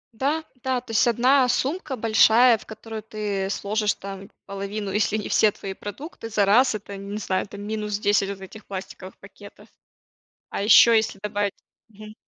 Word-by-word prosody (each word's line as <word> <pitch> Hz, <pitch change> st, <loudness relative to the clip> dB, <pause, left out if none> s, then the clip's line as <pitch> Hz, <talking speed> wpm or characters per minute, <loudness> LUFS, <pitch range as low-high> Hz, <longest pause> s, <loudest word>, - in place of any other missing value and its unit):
Да, 295 Hz, +6 st, -1 dB, 0.2 s
да, 260 Hz, -1 st, 0 dB
то 240 Hz, -2 st, -11 dB
есть 225 Hz, -, +3 dB
1 250 Hz, +2 st, +3 dB
сумка 280 Hz, +1 st, -1 dB
большая, 225 Hz, +1 st, +5 dB
в -, -, -16 dB
которую 220 Hz, 0 st, -8 dB
ты 205 Hz, -3 st, -3 dB
сложишь 210 Hz, +1 st, -1 dB
там 195 Hz, 0 st, -9 dB, 0.2 s
половину, 200 Hz, +1 st, -5 dB
если 210 Hz, +1 st, +1 dB
не 210 Hz, -, -4 dB
все 215 Hz, -1 st, +3 dB
твои 195 Hz, -1 st, -7 dB
продукты 225 Hz, -, -8 dB
за 205 Hz, -2 st, +2 dB
раз, 230 Hz, +3 st, +4 dB
это, 200 Hz, -1 st, -7 dB
не 200 Hz, +1 st, -6 dB
знаю, 185 Hz, -3 st, -1 dB
это 200 Hz, -, -11 dB
минус 210 Hz, 0 st, -3 dB
10 205 Hz, -1 st, +1 dB
вот 200 Hz, -, -6 dB
этих 210 Hz, +3 st, -11 dB
пластиковых 190 Hz, -1 st, -8 dB
пакетов. 205 Hz, +1 st, -15 dB, 0.8 s
А -, -, -4 dB
ещё 230 Hz, +3 st, +7 dB
если 220 Hz, -3 st, +1 dB
добавить 205 Hz, -1 st, -1 dB, 0.3 s
мгм. 215 Hz, 0 st, -13 dB
210 Hz, 170 wpm, -24 LUFS, 200-225 Hz, 0.8 s, ещё